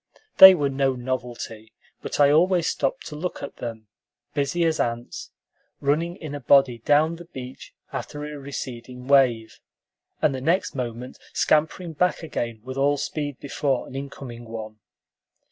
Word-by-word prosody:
They 190 0 +12
were 145 -4 0
no 135 -1 +1
novelty, 120 -3 -5 0.3
but - - -5
I 145 -1 +6
always 175 +2 +3
stopped 135 - -1
to 150 - -7
look 175 +4 -4
at 140 - -7
them; 115 -2 -6 0.5
busy 145 +4 0
as 160 -1 +1
ants, 120 0 -3 0.5
running 160 +5 0
in 155 -6 -8
a 145 - -4
body 135 -2 +4
down 150 +7 +3
the 175 - -11
beach 130 -6 -10 0.2
after 150 0 -5
a 150 -1 -7
receding 125 -2 -7
wave, 125 -5 +3 0.6
and 145 - +2
the 130 - -4
next 170 +7 +1
moment 125 -1 -5
scampering 160 +2 +1
back 180 +3 0
again 115 -8 -4
with 130 +1 -7
all 145 +1 +2
speed 145 -2 -4
before 140 -2 -1
an - - -11
incoming 135 -3 -7
one. 110 -1 -8
140 Hz, 155 wpm, -24 LUFS, 125-150 Hz, 0.6 s, They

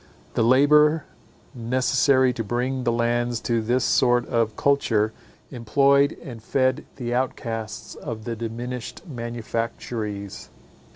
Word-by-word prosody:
The - - 0
labour 150 +5 +5 0.5
necessary 130 +2 +2
to 115 - -3
bring 125 +3 -2
the 120 - +3
lands 120 0 0
to 115 -1 0
this 120 +3 +1
sort 120 -1 +3
of 115 -3 0
culture, 110 -6 +1 0.4
employed 140 +4 +3
and 120 -7 -9
fed 130 +2 0
the 120 -3 -4
offcasts 115 -3 -3
of 110 -2 -6
the 115 +1 -4
diminished 120 - -6
manufactories. 115 - -5
120 Hz, 115 wpm, -24 LUFS, 115-130 Hz, 0.5 s, labour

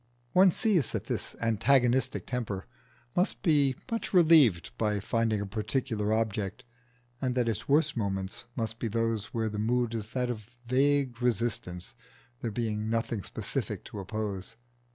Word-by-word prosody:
One 185 +1 +7
sees 180 - +1
that - - -1
this - - -4
antagonistic 120 +3 +2
temper 105 - -3 0.5
must 180 +4 +1
be 145 -7 +4 0.2
much 230 -3 -2
relieved 145 - +6
by 105 -1 +1
finding 115 +1 0
a - - -2
particular 110 +1 -1
object, 110 +1 -1 0.6
and 125 -1 0
that 125 -2 +2
its 115 +2 -2
worst 150 +1 +3
moments 95 -3 -3
must 115 -1 -3
be 115 - -1
those 115 -1 0
where 110 0 -2
the 105 -1 -3
mood 120 +1 +1
is 110 -2 -3
that 125 +1 -1
of 110 -2 -7 0.2
vague 130 -1 +2
resistance, 110 -7 -1 0.5
there 115 - -2
being 110 -1 -2
nothing 115 -1 -1
specific - - -4
to 105 - -7
oppose. 100 +1 -4
115 Hz, 150 wpm, -29 LUFS, 105-130 Hz, 0.6 s, One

